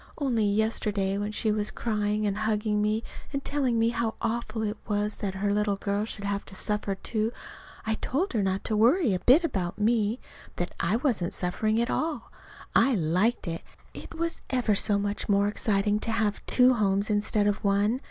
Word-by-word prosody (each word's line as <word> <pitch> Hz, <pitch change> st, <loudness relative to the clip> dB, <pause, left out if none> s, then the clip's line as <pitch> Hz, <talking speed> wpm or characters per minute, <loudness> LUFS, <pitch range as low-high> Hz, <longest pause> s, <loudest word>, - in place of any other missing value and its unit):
Only 245 Hz, -7 st, +1 dB
yesterday, 205 Hz, -2 st, 0 dB
when 205 Hz, +1 st, -2 dB
she 215 Hz, +1 st, 0 dB
was 210 Hz, 0 st, +1 dB
crying 210 Hz, -1 st, -1 dB
and 200 Hz, -1 st, 0 dB
hugging 210 Hz, 0 st, 0 dB
me, 215 Hz, +2 st, 0 dB, 0.3 s
and 275 Hz, -1 st, -4 dB
telling 265 Hz, -5 st, 0 dB
me 225 Hz, 0 st, +3 dB
how 235 Hz, -1 st, -1 dB
awful 230 Hz, -1 st, -2 dB
it 210 Hz, 0 st, -3 dB
was 210 Hz, 0 st, 0 dB
that 195 Hz, -2 st, -3 dB
her 200 Hz, +1 st, 0 dB
little 210 Hz, -1 st, +1 dB
girl 200 Hz, +1 st, -1 dB
should 200 Hz, -2 st, -6 dB
have 200 Hz, 0 st, -1 dB
to 190 Hz, -, -10 dB
suffer, 210 Hz, 0 st, -1 dB
too, 215 Hz, +3 st, -2 dB, 0.5 s
I 220 Hz, -, 0 dB
told 285 Hz, -, -1 dB
her 220 Hz, -, +1 dB
not 190 Hz, 0 st, -1 dB
to 215 Hz, -, -1 dB
worry 240 Hz, -, +4 dB
a 180 Hz, -, 0 dB
bit 275 Hz, -, +5 dB
about 185 Hz, -, -2 dB
me; 220 Hz, +1 st, +1 dB, 0.4 s
that 175 Hz, -, -3 dB
I 170 Hz, +6 st, +1 dB
wasn't 230 Hz, -, 0 dB
suffering 215 Hz, +5 st, 0 dB
at 235 Hz, -, 0 dB
all. 310 Hz, -7 st, -2 dB, 0.4 s
I 255 Hz, +2 st, +4 dB
liked 185 Hz, +6 st, +1 dB
it. 165 Hz, 0 st, -3 dB, 0.3 s
It -, -, -10 dB
was 335 Hz, 0 st, -2 dB
ever 245 Hz, -5 st, +1 dB
so 200 Hz, 0 st, +3 dB
much 205 Hz, +1 st, -3 dB
more 200 Hz, 0 st, +3 dB
exciting 205 Hz, 0 st, +1 dB
to 225 Hz, -, -2 dB
have 220 Hz, -2 st, 0 dB
two 255 Hz, 0 st, +6 dB
homes 200 Hz, -2 st, +1 dB
instead 205 Hz, 0 st, +1 dB
of 205 Hz, 0 st, 0 dB
one. 205 Hz, +4 st, +2 dB
210 Hz, 190 wpm, -27 LUFS, 200-230 Hz, 0.5 s, two